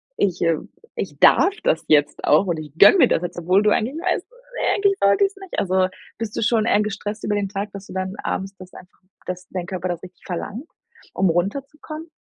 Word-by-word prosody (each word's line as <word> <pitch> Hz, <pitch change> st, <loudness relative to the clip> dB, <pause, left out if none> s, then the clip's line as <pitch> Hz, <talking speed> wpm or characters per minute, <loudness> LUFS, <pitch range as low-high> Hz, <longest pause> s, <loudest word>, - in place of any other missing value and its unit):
ich 185 Hz, -3 st, 0 dB
äh, 165 Hz, -2 st, +2 dB, 0.4 s
ich 145 Hz, -6 st, -5 dB
darf 380 Hz, +3 st, +6 dB
das 160 Hz, -, +1 dB
jetzt 145 Hz, -2 st, +2 dB
auch 155 Hz, +6 st, +4 dB
und 170 Hz, -2 st, -1 dB
ich 150 Hz, -2 st, -8 dB
gönne 205 Hz, -, +8 dB
mir -, -, +6 dB
das -, -, +1 dB
jetzt“, 175 Hz, 0 st, -5 dB
obwohl 185 Hz, +4 st, +3 dB
du 210 Hz, -, +3 dB
eigentlich 245 Hz, +7 st, 0 dB
weißt, 365 Hz, 0 st, -1 dB, 0.5 s
eigentlich 400 Hz, -1 st, +2 dB
sollte 200 Hz, -, +4 dB
ich's 390 Hz, +1 st, -4 dB
nicht“. 385 Hz, -2 st, -6 dB
Also, 185 Hz, -1 st, +2 dB, 0.3 s
bist 220 Hz, -1 st, -5 dB
du -, -, -2 dB
schon 220 Hz, 0 st, +2 dB
eher 210 Hz, -, +3 dB
gestresst 210 Hz, +1 st, -4 dB
über 210 Hz, -, 0 dB
den 200 Hz, -1 st, -1 dB
Tag, 200 Hz, +1 st, -4 dB
dass 200 Hz, 0 st, -8 dB
du -, -, -10 dB
dann 190 Hz, +1 st, -3 dB
abends 195 Hz, +1 st, -3 dB
das 185 Hz, 0 st, -13 dB
einfach 180 Hz, -, -15 dB, 0.3 s
dass 180 Hz, 0 st, -5 dB
dein 180 Hz, -2 st, -4 dB
Körper 185 Hz, -1 st, -4 dB
das 175 Hz, -1 st, -3 dB
richtig 180 Hz, -1 st, -14 dB
verlangt, 210 Hz, -, -5 dB, 0.5 s
um 190 Hz, -1 st, +2 dB
runterzukommen? 280 Hz, -, -3 dB
195 Hz, 215 wpm, -22 LUFS, 180-220 Hz, 0.5 s, gönne